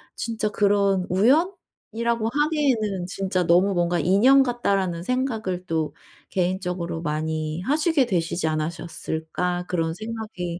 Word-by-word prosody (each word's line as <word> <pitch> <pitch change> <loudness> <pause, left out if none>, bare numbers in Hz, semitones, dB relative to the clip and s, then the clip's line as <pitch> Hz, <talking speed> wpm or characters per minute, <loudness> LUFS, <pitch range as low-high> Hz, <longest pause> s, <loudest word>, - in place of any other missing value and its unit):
'진짜 225 -2 -2
그런 200 -2 +2
우연이라고 235 - 0
하기에는 270 - +1
'진짜 185 -1 -1
너무 180 +4 +4
뭔가 175 0 +1
인연 240 +10 +5
같다.'라는 195 -8 -1
생각을 220 -7 -2
또 160 -2 -1 0.4
개인적으로 180 -2 -2
많이 155 +1 -2
하시게 300 - +2
되시지 170 -3 -1
않으셨을까?' 165 +2 -3
그런 165 -2 -1
생각이 215 -5 -5
190 Hz, 295 characters per minute, -24 LUFS, 170-230 Hz, 0.4 s, 인연